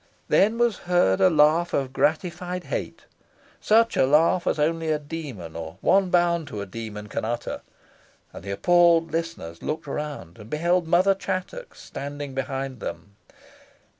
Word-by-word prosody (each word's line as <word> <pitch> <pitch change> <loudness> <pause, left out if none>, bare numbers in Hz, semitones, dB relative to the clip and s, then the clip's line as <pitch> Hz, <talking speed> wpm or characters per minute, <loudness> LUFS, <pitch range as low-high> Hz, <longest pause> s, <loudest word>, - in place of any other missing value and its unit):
Then 215 +4 +3
was 240 -2 +2
heard 175 - +3
a 185 - +6
laugh 160 +2 +3
of 130 -1 -2
gratified 175 +4 -1
hate - - -5 0.5
such 230 +2 +3
a 130 - +3
laugh 165 +5 +3
as - - +1
only 160 +2 0
a 155 - +2
demon, 145 - -7
or 80 -1 -7
one 195 -1 +3
bound 170 -3 +2
to 105 - -6
a 100 - -4
demon, 105 +1 -7
can - - -4
utter 120 +2 -3 0.7
and - - -10
the 100 - -7
appalled 170 - +3
listeners 165 - -4
looked 150 0 -4
around, 140 - -6
and 105 +1 -12
beheld 170 +3 +1
Mother 180 +4 +4
Chattox 195 - -5
standing 145 0 -7
behind 135 -1 -4
them. 100 0 -7
155 Hz, 155 wpm, -24 LUFS, 130-175 Hz, 0.7 s, a